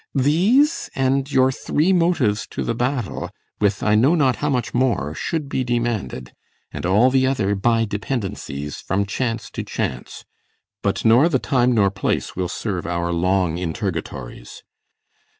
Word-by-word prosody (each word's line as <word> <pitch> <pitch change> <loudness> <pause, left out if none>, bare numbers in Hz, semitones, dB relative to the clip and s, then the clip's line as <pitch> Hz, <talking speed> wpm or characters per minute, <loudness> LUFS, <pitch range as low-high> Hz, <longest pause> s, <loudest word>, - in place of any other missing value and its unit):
These, 190 - +3
And 135 +1 0
your 130 -1 +4
three 155 +7 +1
motives 165 - +1
to - - -4
the - - -1
battle, 125 -2 -2 0.3
with 100 -1 +1
I 105 - +3
know 130 +10 +4
not 135 -6 +2
how 150 - -1
much 125 -5 -1
more, 120 - 0
should 155 - -3
be 130 -1 -1
demanded, 120 - -2 0.4
And - - -4
all 105 +8 +4
the 130 0 +3
other 105 -7 +1
by 115 +3 +2
dependences, 100 - -4
From 100 +2 -1
chance 115 +3 -3
to - - -4
chance; 65 -1 -5 0.6
but 100 +2 -1
nor 120 +9 +6
the 140 - +2
time 125 -1 +1
nor 100 -4 +3
place 95 - -2
Will 90 -1 -2
serve 95 -2 -3
our 85 0 -1
long 90 -1 +1
interrogatories. 80 - -5
115 Hz, 150 wpm, -21 LUFS, 95-130 Hz, 0.6 s, nor